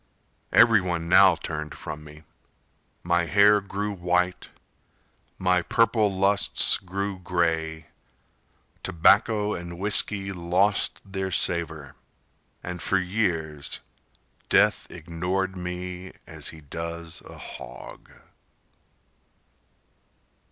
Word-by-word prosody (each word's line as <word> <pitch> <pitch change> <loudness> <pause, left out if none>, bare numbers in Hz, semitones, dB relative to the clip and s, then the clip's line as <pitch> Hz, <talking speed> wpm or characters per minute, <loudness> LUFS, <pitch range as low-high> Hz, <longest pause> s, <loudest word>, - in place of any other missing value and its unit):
Everyone 90 -8 +4
now 95 0 +6
turned 75 -1 -6
from 75 - -8
me. 75 +1 -14 0.8
My 85 0 +1
hair 105 +2 +5
grew 100 +1 -4
white, 90 0 -1 0.9
My 90 -1 +2
purple 110 +1 +2
lusts 100 +1 +4
grew 100 +1 -4
gray, 80 -3 -1 1.0
Tobacco 105 +4 +3
and 85 0 -7
whisky 100 0 +2
lost 90 +3 +1
their 95 -1 -4
savor 80 -5 0 0.7
And 90 -1 -6
for 95 - +1
years 90 -6 -2 0.7
Death - - +3
ignored 90 +4 -3
me 90 +1 -6
As - - -4
he 80 - -6
does 85 +3 -7
a - - -12
hog. - - -11
90 Hz, 90 wpm, -25 LUFS, 85-95 Hz, 1.0 s, now